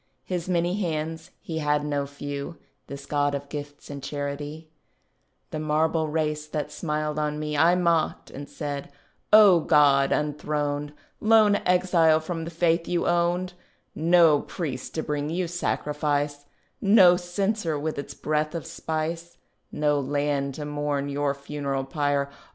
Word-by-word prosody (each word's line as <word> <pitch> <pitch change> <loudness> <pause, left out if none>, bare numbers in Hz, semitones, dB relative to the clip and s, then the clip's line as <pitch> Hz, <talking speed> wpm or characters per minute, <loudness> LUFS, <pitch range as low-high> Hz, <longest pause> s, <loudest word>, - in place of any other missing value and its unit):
His 180 -1 -4
many 175 +3 0
hands 160 -1 -3
(he 160 -1 -4
had 150 -1 +1
no 145 -1 -1
few, 140 +3 -6 0.3
This 140 0 -8
God 145 -1 0
of 140 0 -6
gifts 145 -1 -7
and 140 -1 -6
charity), 145 +3 -5 0.8
The 155 - -3
marble 155 +1 +1
race, 150 -1 -1
that 150 -1 -4
smiled 150 -2 -2
on 150 0 -1
me, 150 0 -3
I 165 +4 +5
mocked, 170 -3 0
and 145 +1 -8
said, 145 -2 -5 0.4
"O 205 -5 +8
God 140 -3 +4
unthroned, 150 -1 -1 0.3
Lone 215 -2 +5
exile 180 -3 +4
from 165 0 -4
the - - -5
faith 165 0 +1
you 175 -1 0
owned, 175 +1 +1 0.4
No 165 -2 +4
priest 135 -7 -5
to 160 - -1
bring 150 -1 -2
you 175 +2 -1
sacrifice, 145 -3 -2 0.3
No 195 -3 +7
censer 175 -1 -1
with 150 0 -3
its 140 - -7
breath 155 +1 -1
of 165 - -4
spice, 165 +1 -4 0.3
No 150 -1 +1
land 140 0 -1
to 150 - -5
mourn 145 -1 -2
your 140 0 -1
funeral 140 -1 -3
pyre. 140 0 0
150 Hz, 145 wpm, -25 LUFS, 145-170 Hz, 0.8 s, O